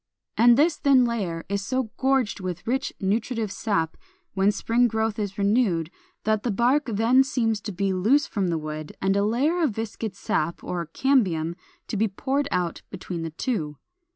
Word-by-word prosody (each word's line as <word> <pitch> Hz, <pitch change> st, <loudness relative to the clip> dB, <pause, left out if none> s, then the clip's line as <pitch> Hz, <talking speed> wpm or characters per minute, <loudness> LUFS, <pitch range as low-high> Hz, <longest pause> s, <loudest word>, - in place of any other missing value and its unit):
And 235 Hz, +1 st, +6 dB
this 320 Hz, +3 st, +3 dB
thin 270 Hz, -3 st, +4 dB
layer 195 Hz, -9 st, -2 dB
is 200 Hz, 0 st, -2 dB
so 255 Hz, +1 st, -2 dB
gorged 265 Hz, -6 st, +1 dB
with 180 Hz, -1 st, -5 dB
rich 265 Hz, +3 st, -1 dB
nutritive 220 Hz, +2 st, -1 dB
sap 175 Hz, -6 st, -1 dB, 0.4 s
when 195 Hz, +1 st, +3 dB
spring 230 Hz, +4 st, +2 dB
growth 220 Hz, -1 st, -1 dB
is 200 Hz, -2 st, -3 dB
renewed, 200 Hz, -6 st, +1 dB, 0.3 s
that 215 Hz, -1 st, +1 dB
the 245 Hz, -, -2 dB
bark 245 Hz, +8 st, +2 dB
then 230 Hz, +4 st, +4 dB
seems 225 Hz, -6 st, 0 dB
to 210 Hz, -, -5 dB
be 195 Hz, +1 st, -1 dB
loose 230 Hz, +11 st, +3 dB
from 200 Hz, -4 st, -2 dB
the 170 Hz, -2 st, 0 dB
wood 155 Hz, 0 st, -6 dB
and 195 Hz, +1 st, +1 dB
a 200 Hz, -, +2 dB
layer 275 Hz, +11 st, +1 dB
of 280 Hz, -11 st, +1 dB
viscid 220 Hz, -2 st, -4 dB
sap 170 Hz, -3 st, -2 dB
(or 170 Hz, -2 st, -3 dB
cambium) 175 Hz, -, +1 dB, 0.3 s
to 215 Hz, -, -3 dB
be 220 Hz, +2 st, +2 dB
poured 275 Hz, +8 st, -1 dB
out 175 Hz, -2 st, -1 dB
between 180 Hz, -1 st, -6 dB
the 165 Hz, -, -3 dB
two. 160 Hz, -, -3 dB
210 Hz, 180 wpm, -25 LUFS, 185-245 Hz, 0.4 s, And